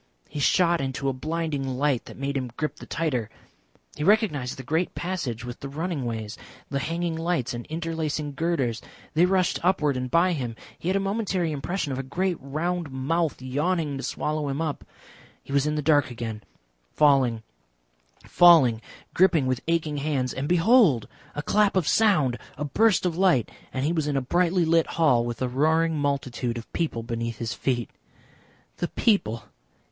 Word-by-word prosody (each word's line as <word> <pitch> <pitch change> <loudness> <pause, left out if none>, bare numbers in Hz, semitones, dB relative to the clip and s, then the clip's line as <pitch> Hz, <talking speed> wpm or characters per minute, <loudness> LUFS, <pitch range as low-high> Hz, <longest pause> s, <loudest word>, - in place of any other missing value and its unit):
He 150 - -6
shot 170 +3 +3
into 135 0 -2
a - - -1
blinding 145 -2 -3
light 140 -3 +1
that - - -11
made 140 +1 -3
him 130 -2 -2
grip 155 - -2
the - - -11
tighter. 130 -10 -1 0.7
He - - -4
recognised 170 - +2
the 130 - -7
great 160 +7 -1
passage 140 -10 -3
with 120 -1 -7
the 140 - -6
running 155 -1 -3
ways, 110 -2 -5 0.3
the 140 - 0
hanging 165 +3 -2
lights 165 -6 -1
and 120 0 -6
interlacing 160 -2 -3
girders. 140 -7 -1 0.3
They 170 +4 +4
rushed 185 -2 +1
upward 155 -6 +2
and 125 0 -3
by 175 +6 +3
him. 125 -7 -3 0.2
He 175 - -2
had 190 - +1
a - - +3
momentary 195 -4 -1
impression 150 +2 -3
of 130 - -3
a - - 0
great 170 +7 -1
round 160 +4 -3
mouth 150 +4 -1
yawning 150 +3 -1
to - - -5
swallow 150 0 -2
him 135 +2 -2
up. 160 -3 -3 0.6
He 140 - -8
was 140 +1 +2
in 150 - 0
the 150 - -2
dark 145 -1 +3
again, 115 -3 -5 0.5
falling, 130 -6 +3 0.8
falling, 150 -11 +6 0.3
gripping 170 -6 +4
with 130 -1 -1
aching 160 -3 0
hands, 140 -3 -1
and 135 +2 -3
behold! 175 - +4 0.3
a 150 - -3
clap 205 +4 +2
of 180 -5 +1
sound, 165 - +3 0.2
a 150 - -2
burst 210 +7 +3
of 170 -2 -1
light, 180 - +3 0.2
and 130 +1 -2
he 160 - +1
was 160 -3 0
in 145 -2 0
a - - +3
brightly 175 +5 +2
lit 165 0 +3
hall 140 -8 +4
with 120 +1 -3
a - - +1
roaring 160 +5 +2
multitude 135 -4 -1
of 115 - -10
people 150 -9 -2
beneath 115 -1 -4
his 115 +1 -3
feet. 120 -3 -2 0.9
The - - -1
people! 115 - +1
150 Hz, 180 wpm, -25 LUFS, 130-170 Hz, 0.9 s, falling